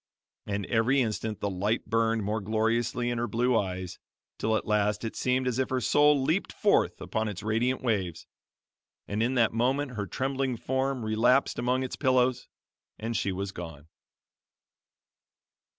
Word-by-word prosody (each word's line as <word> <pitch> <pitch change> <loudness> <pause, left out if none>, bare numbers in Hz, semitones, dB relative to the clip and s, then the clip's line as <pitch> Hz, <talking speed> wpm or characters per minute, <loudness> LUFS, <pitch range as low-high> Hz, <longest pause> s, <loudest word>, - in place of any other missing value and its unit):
And 100 -1 -2
every 120 +6 +2
instant 110 -3 -2
the 100 - 0
light 100 +5 -1
burned 115 -1 +1
more 105 +2 -1
gloriously 115 +3 0
in 120 - -2
her 120 - -1
blue 120 +2 +1
eyes 95 -4 -2 0.4
till 110 0 +1
at - - -5
last 105 0 +1
it 110 - -4
seemed 130 0 0
as 125 0 0
if 130 - 0
her 130 - 0
soul 145 +3 +4
leaped 165 +8 0
forth 205 - +2
upon 110 0 -2
its 100 -2 -5
radiant 120 +5 0
waves; 95 -9 -1 0.8
and 105 +2 -2
in 125 +3 +1
that 115 -3 +3
moment 130 +4 +1
her 105 -4 -4
trembling 130 +3 -1
form 130 0 -1
relapsed 120 +5 +2
among 125 +2 +1
its 130 - -4
pillows 130 -2 +2 0.5
and 115 +1 -4
she 100 - 0
was 95 +1 -3
gone. 80 -5 -9
115 Hz, 160 wpm, -28 LUFS, 105-130 Hz, 0.8 s, soul